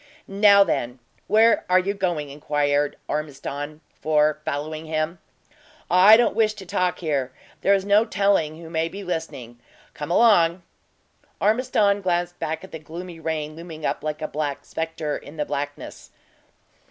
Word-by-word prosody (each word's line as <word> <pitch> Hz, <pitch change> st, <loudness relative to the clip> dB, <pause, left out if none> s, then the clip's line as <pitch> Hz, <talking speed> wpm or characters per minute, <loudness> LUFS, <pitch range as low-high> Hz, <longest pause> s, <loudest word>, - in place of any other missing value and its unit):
"Now, 200 Hz, 0 st, +6 dB
then, 125 Hz, -9 st, -2 dB, 0.3 s
where 220 Hz, +2 st, +4 dB
are 180 Hz, -, +5 dB
you 190 Hz, +2 st, +1 dB
going?" 175 Hz, -7 st, -2 dB
inquired 145 Hz, 0 st, 0 dB
Ormiston 145 Hz, 0 st, -5 dB
for, 150 Hz, -1 st, +1 dB
following 155 Hz, +2 st, -4 dB
him. 155 Hz, +2 st, -2 dB, 0.7 s
"I 190 Hz, +5 st, +8 dB
don't 240 Hz, -, +2 dB
wish 215 Hz, -1 st, +2 dB
to 195 Hz, -3 st, -10 dB
talk 180 Hz, 0 st, 0 dB
here; 140 Hz, -6 st, -2 dB, 0.3 s
there 200 Hz, -, +4 dB
is 195 Hz, -1 st, -2 dB
no 205 Hz, +2 st, +5 dB
telling 195 Hz, -8 st, +1 dB
who 170 Hz, -, -10 dB
may 165 Hz, 0 st, 0 dB
be 200 Hz, +3 st, -8 dB
listening. 135 Hz, -9 st, -5 dB, 0.3 s
Come 150 Hz, -, -6 dB
along." 175 Hz, -4 st, +4 dB, 0.8 s
Ormiston 210 Hz, -2 st, +2 dB
glanced 175 Hz, -1 st, -1 dB
back 160 Hz, +2 st, -3 dB
at 190 Hz, -, -11 dB
the 160 Hz, -, -7 dB
gloomy 170 Hz, +2 st, -9 dB
rain 155 Hz, -1 st, -3 dB
looming 160 Hz, -2 st, -8 dB
up -, -, -2 dB
like 155 Hz, 0 st, -4 dB
a -, -, -1 dB
black 145 Hz, -2 st, -4 dB
spectre 160 Hz, -2 st, -3 dB
in 150 Hz, +3 st, -13 dB
the 150 Hz, -, -1 dB
blackness. 145 Hz, +1 st, -6 dB
160 Hz, 155 wpm, -23 LUFS, 150-195 Hz, 0.8 s, I